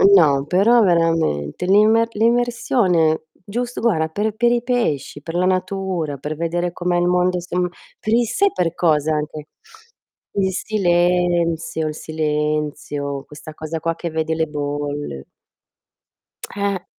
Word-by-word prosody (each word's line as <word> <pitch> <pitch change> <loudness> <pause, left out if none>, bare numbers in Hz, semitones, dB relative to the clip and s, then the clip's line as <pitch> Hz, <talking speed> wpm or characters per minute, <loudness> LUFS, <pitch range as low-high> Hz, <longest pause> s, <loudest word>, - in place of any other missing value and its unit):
no, 140 -6 +4
però 220 +8 +4
veramente 165 - +1
l'imme 215 +4 +4
l'immersione, 230 -8 +2
giust 240 +6 -5
guarda, 165 -9 +1
per 210 +5 -2
per 240 +1 +3
i 240 -1 +2
pesci, 155 - -1
per 165 - -6
la 180 +1 +2
natura, 185 -5 -1
per 150 +3 -5
vedere 170 +2 -1
com'è 175 0 -1
il 175 0 +2
mondo 180 0 +2
som 180 +1 -1 0.3
per 215 - -1
il 240 0 +4
s - - -4
sai 400 0 +4
per 175 -2 -1
cosa 155 -2 +2
anche? 150 0 -4 0.9
Il 190 -1 +1
silenzio, 175 -5 +1
il 150 - -4
silenzio, 150 -2 -2
questa 150 +1 -11
cosa 160 +1 -5
qua 165 +1 -1
che 170 -1 -5
vedi 160 0 -1
le 160 0 +1
bolle. 145 - -4 1.3
Eh. 200 -2 -2
175 Hz, 140 wpm, -20 LUFS, 155-195 Hz, 1.3 s, no